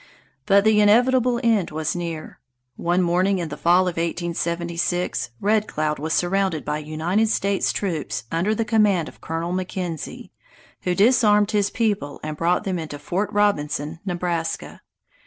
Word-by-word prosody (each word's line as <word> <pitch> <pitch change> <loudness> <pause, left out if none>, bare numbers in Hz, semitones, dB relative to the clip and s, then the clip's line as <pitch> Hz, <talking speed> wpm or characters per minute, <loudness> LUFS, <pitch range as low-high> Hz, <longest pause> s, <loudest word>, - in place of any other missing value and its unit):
But 200 0 +5
the 215 -1 +4
inevitable 245 +3 +4
end 220 -6 +2
was 155 +1 -2
near. 170 -3 -5 0.4
One 175 +2 +1
morning 185 +3 +2
in 170 -3 -3
the 150 - -5
fall 175 +2 +4
of 180 -2 -3
1876 170 -3 -2
Red 210 +1 +1
Cloud 150 -1 -2
was 160 +2 -3
surrounded 180 -2 0
by 150 +1 -2
United 165 +8 0
States 200 -2 +1
troops 170 - -3
under 180 +7 +1
the 225 - -1
command 210 -7 +2
of - - -19
Colonel 165 +2 -3
McKenzie, 180 -3 -5 0.5
who 180 -1 +1
disarmed 210 -1 +4
his 205 -2 +2
people 205 -12 -1
and 155 0 -4
brought 170 +5 +1
them 190 -4 -2
into 155 -3 -6
Fort 175 +8 -2
Robinson, 155 -6 0
Nebraska. 175 -3 -3
180 Hz, 150 wpm, -23 LUFS, 165-205 Hz, 0.5 s, But